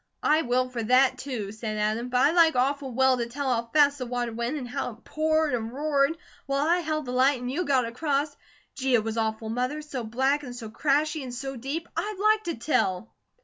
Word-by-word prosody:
"I 310 +1 +4
will 255 -1 +1
for 250 -2 -4
THAT, 255 +3 +3
too," 240 -7 -4
said 215 0 -5
Adam, 215 +3 -1
"but 250 - 0
I'd 300 +5 +4
like 330 -3 +5
awful 270 +1 0
well 260 +1 +3
to 235 -1 -2
tell 265 +1 -1
how 230 0 -2
fast 285 -2 +4
the 250 - -4
water 240 -1 -2
went, 235 +6 -2
and 255 -4 -5
how 250 -1 -3
it 230 - -21
poured 315 -1 +1
and 225 -2 -2
roared, 285 +2 +1 0.3
while 275 +1 +1
I 345 +2 +3
held 310 -3 -2
the 245 - -5
light, 260 +1 +3
and 250 +1 -4
you 350 +6 -1
got 265 -4 +2
across. 285 +4 -1 0.4
Gee, 265 -2 +1
if 220 - +2
was 225 0 -3
awful, 220 0 -2
Mother! 255 +6 -2
So 270 -5 -5
black, 265 +6 +1
and 250 -4 -8
so 225 -3 -8
crashy, 300 +5 +1
and 255 -2 -6
so 270 +2 -5
deep. 275 +7 -4
I'd 420 -1 -3
LIKE 430 0 +3
to 335 - -2
tell!" 225 -6 -1
260 Hz, 230 wpm, -26 LUFS, 240-295 Hz, 0.4 s, like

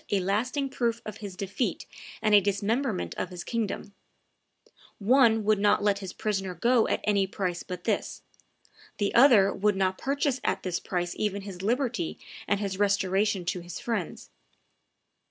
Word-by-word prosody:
a 200 - +2
lasting 235 +9 0
proof 235 -3 -1
of 215 - -6
his 200 -3 -8
defeat 200 +6 -3 0.4
and 215 -1 +3
a 205 - +8
dismemberment 205 +3 -1
of 185 - -2
his 180 -1 -7
kingdom: 215 -3 -3 1.0
one 225 0 +4
would 210 -1 +2
not 205 0 +3
let 200 -1 +2
his 190 -2 -6
prisoner 195 -3 -2
go 235 +6 +3
at - - 0
any 200 -2 +2
price 185 -3 -3
but 180 -1 -7
this, - - -2 0.7
the 200 -1 0
other 235 -6 +6
would 205 +1 +1
not 190 -1 0
purchase 275 -1 0
at - - -1
this 180 -2 -2
price 175 -1 -3
even 200 -2 -1
his 190 -3 -8
liberty 235 - -1 0.3
and 200 -1 +1
his 195 -2 -3
restoration 200 -1 +1
to 180 - -1
his 175 -1 -8
friends. 215 -8 -4
205 Hz, 160 wpm, -27 LUFS, 190-225 Hz, 1.0 s, a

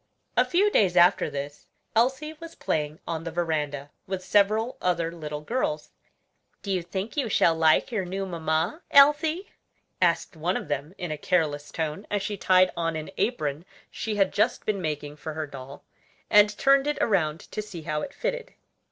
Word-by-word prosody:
A - - +5
few 400 +4 +2
days 185 - +3
after 175 0 +5
this, 145 0 -6 0.3
Elsie 265 +7 +1
was 330 -1 -10
playing 150 0 -2
on 165 -1 -3
the 165 - -4
veranda, 150 -4 -2 0.2
with 190 -1 -4
several 215 +5 +2
other 170 -2 0
little 150 -3 -6
girls. 150 -5 -2 0.7
"Do 200 - -3
you 185 -2 +1
think 190 - -5
you 275 -6 0
shall 170 -4 +4
like 160 +4 +3
your 215 -5 -1
new 190 +2 -3
mamma, 170 - -1
Elsie?" 310 +6 +5 0.5
asked 190 - +1
one 170 +4 -1
of - - -7
them 145 +5 -3
in 175 -3 -4
a 155 - -4
careless 150 -4 0
tone, 160 +4 -4
as 205 -1 -1
she 205 0 -3
tied 185 -1 +4
on 165 -1 -1
an 155 0 -5
apron 150 - -1 0.3
she 220 -1 -3
had 195 -2 +2
just 215 +4 +1
been 205 -3 -1
making 150 -2 -4
for 155 0 -6
her 155 -1 -2
doll, 135 -1 -10 0.5
and 210 0 +6
turned 275 +1 +4
it 295 - 0
around 165 -7 +1
to 215 - -3
see 185 -6 -9
how 150 -1 -2
it - - -5
fitted. - - -4
175 Hz, 180 wpm, -26 LUFS, 155-215 Hz, 0.7 s, and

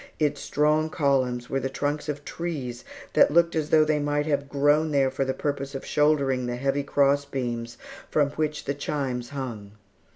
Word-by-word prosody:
Its 150 -2 0
strong 150 +1 +1
columns 130 -5 0
were 135 - -1
the 135 0 -2
trunks 145 +2 -2
of 145 0 -4
trees 135 -8 -5 0.3
that - - +6
looked 170 +2 +3
as 155 -2 -1
though 155 -1 +5
they 155 -1 +1
might 145 0 0
have 140 -2 -1
grown 145 +3 +3
there 135 -3 +2
for 135 - -1
the 130 - -1
purpose 140 0 -3
of 135 - -5
shouldering 140 -4 +2
the 120 - -2
heavy 135 +3 0
cross 140 0 +2
beams 120 -4 -4 0.3
from 145 -2 +2
which 150 0 -2
the 140 - -1
chimes 135 -4 -3
hung. 115 -8 -6
140 Hz, 185 wpm, -26 LUFS, 130-150 Hz, 0.3 s, that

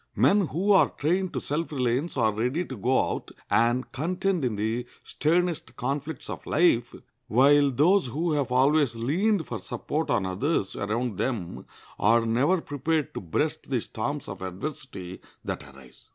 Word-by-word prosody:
Men 200 -3 +4
who 180 +9 0
are 195 - +6
trained 180 +5 0
to - - -1
self 155 +3 -3
reliance 130 +3 -1
are 110 -3 +3
ready 125 +11 -1
to 130 - -7
go 125 +5 +1
out - - -5 0.2
and 120 +2 +2
contend 180 +4 -1
in 120 -4 0
the 110 +4 -2 0.2
sternest 170 +1 0
conflicts 140 +3 -3
of - - -6
life, 135 -8 +2 0.3
while 140 +4 +5
those 155 +6 +3
who 160 +7 -1
have 145 -5 0
always 135 0 +3
leaned 165 - +1
for 110 - -5
support 155 - -3
on 110 -5 +1
others 95 - -1
around 110 +1 -2
them 105 -10 -3 0.3
are 115 +3 +4
never 135 +11 +2
prepared 150 +1 -1
to - - -5
breast 85 -4 -2
the - - +1
storms - - -4
of - - -7
adversity 95 - -6 0.2
that - - -4
arise. 65 -2 -18
135 Hz, 160 wpm, -26 LUFS, 115-160 Hz, 0.3 s, are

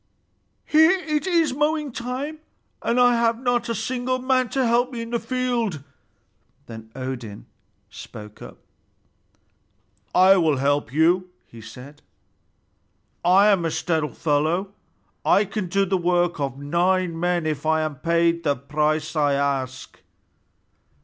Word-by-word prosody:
"Here 315 +1 +5
it 305 -1 -2
is 330 -6 +2
mowing 300 0 0
time, 255 +6 -5 0.4
and 240 - 0
I 245 0 +5
have 230 0 +1
not 245 -1 0
a 230 - -1
single 250 +3 -2
man 255 -1 +1
to 265 +1 0
help 240 +2 +2
me 235 -2 -5
in 230 - -9
the 235 - 0
field!" 240 - -2 0.8
Then 110 -1 -11
Odin 125 -5 -6 0.5
spoke 105 -1 -11
up. - - -11 1.6
"I 190 +1 +6
will 160 -5 +2
help 140 -2 0
you," 175 +5 +2 0.2
he 115 - -14
said. 125 +6 -12 1.2
"I 195 +4 +5
am 195 -4 +3
a 165 - 0
stout 160 -2 -2
fellow, 155 +2 +1 0.6
and - - +2
I 205 - +4
can 200 -1 -4
do 195 +3 +1
the 190 0 0
work 175 -1 +1
of 135 -2 -3
nine 170 +4 0
men 175 -1 0
if 155 -1 -3
I 160 0 +2
am 155 -1 -2
paid 170 +3 +1
the 145 -3 +1
price 150 +3 -1
I 145 -2 +2
ask." 135 -2 -3
175 Hz, 145 wpm, -23 LUFS, 145-240 Hz, 1.6 s, I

